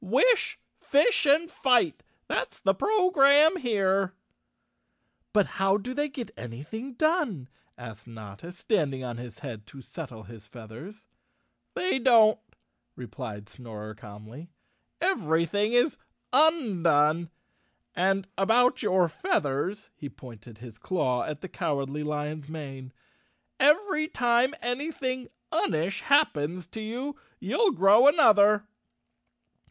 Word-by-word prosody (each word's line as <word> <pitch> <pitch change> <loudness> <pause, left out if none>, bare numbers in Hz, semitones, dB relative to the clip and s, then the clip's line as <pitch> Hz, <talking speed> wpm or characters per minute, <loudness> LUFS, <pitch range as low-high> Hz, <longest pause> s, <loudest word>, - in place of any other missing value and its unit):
Wish, 440 - +2 0.2
fish 295 +4 +2
and 310 +4 +4
fight—that's 270 -1 -1
the 195 - +2
program 320 - +4
here." 195 - 0 1.2
"But 205 -2 +3 0.2
how 195 +1 +3
do 245 +5 -6
they 290 +2 -1
get 260 -3 -7
anything 150 - -8
done?" 295 - 0 0.3
asked 115 -2 -11
Notta, 110 - -10
standing 155 - -2
on 120 -2 -5
his 120 -1 -9
head 110 -5 -8
to 135 -1 -13
settle 125 -10 -9
his 110 0 -14
feathers. 120 - -12 0.7
\They 365 -7 0
don't," 230 -3 +5 0.6
replied 115 -4 -8
Snorer 110 -3 -10
calmly. 110 +8 -12 0.5
"Everything 205 - 0
is 245 +5 +2 0.4
undone; 170 - +3 0.7
and 190 +1 0
about 245 +6 +3
your 185 -5 +2
feathers," 160 +6 -2
he 145 - -8
pointed 115 -3 -14
his 115 -1 -13
claw 130 -9 -1
at 150 0 -6
the 190 - -6
Cowardly 140 -3 -3
Lion's 150 0 -4
mane, 135 -5 -8 0.7
"every 310 +1 +3
time 245 +1 +1
any¬ 255 +7 -2
thing 255 -1 -3 0.2
unish 165 +5 -1
happens 180 - +1
to 220 +6 -9
you 250 +6 -5 0.2
you'll 455 -4 +1
grow 210 - +5
another. 210 -9 +5
190 Hz, 115 wpm, -27 LUFS, -, 1.2 s, don't